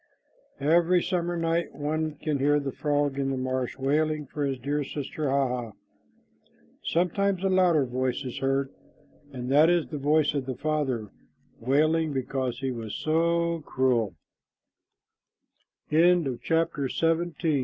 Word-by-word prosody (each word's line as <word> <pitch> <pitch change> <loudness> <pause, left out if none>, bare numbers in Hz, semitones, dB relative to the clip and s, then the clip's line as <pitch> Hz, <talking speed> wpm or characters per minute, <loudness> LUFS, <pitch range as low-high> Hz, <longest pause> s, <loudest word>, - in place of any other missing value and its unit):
Every 170 +4 +3
summer 175 -1 -1
night 165 -1 -1
one 155 +1 -2
can 150 -1 -2
hear 145 +2 +3
the 140 -1 -3
frog 145 -1 0
in 135 -1 0
the 135 - -1
marsh 130 -1 -2
wailing 150 +2 0
for 145 +2 -4
his 135 -2 -1
dear 145 +4 -2
sister 145 +1 -4
Hah 135 0 +2
hah. 125 -2 -4 1.1
Sometimes 185 +2 0
a 195 - +2
louder 180 -6 +4
voice 130 +2 -2
is 125 +2 -5
heard, 135 0 0 0.6
and 125 -1 -5
that 150 +4 +6
is 175 -2 +2
the 150 - -4
voice 150 +1 +2
of 140 -3 -2
the 130 - -3
father 135 -9 -1 0.5
wailing 155 +5 +2
because 130 -2 -2
he 135 -1 -1
was 115 -3 -5
so 170 +1 +1
crue 125 -5 +1
145 Hz, 130 wpm, -27 LUFS, 130-160 Hz, 1.1 s, that